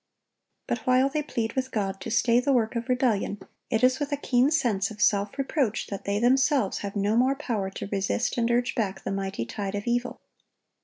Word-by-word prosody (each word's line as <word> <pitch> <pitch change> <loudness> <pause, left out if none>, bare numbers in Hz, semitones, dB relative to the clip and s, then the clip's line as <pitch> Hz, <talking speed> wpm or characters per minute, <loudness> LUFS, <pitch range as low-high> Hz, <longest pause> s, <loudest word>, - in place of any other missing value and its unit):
But 240 - -2
while 255 +2 +4
they 300 +2 -1
plead 230 -6 -3
with 260 0 -2
God 195 -5 -2
to 205 - -5
stay 235 +1 +3
the 275 +3 +1
work 230 -2 +1
of 235 +1 -3
rebellion, 235 -5 +1 0.3
it 225 0 0
is 255 +2 +4
with 290 0 -3
a 285 - 0
keen 255 -1 +2
sense 235 -11 +1
of 215 -1 -11
self 205 +1 +2
reproach 270 -5 0
that 200 - -5
they 200 0 0
themselves 255 -1 +2
have 200 0 -5
no 205 +2 +1
more 260 +3 +3
power 230 -9 -2
to 195 - -6
resist 200 +4 -1
and 235 -1 +1
urge 240 +1 +1
back 195 -4 -2
the - - -3
mighty 195 -11 -3
tide 195 - -4
of 205 - -4
evil. 240 +1 -1
235 Hz, 210 wpm, -26 LUFS, 200-255 Hz, 0.3 s, while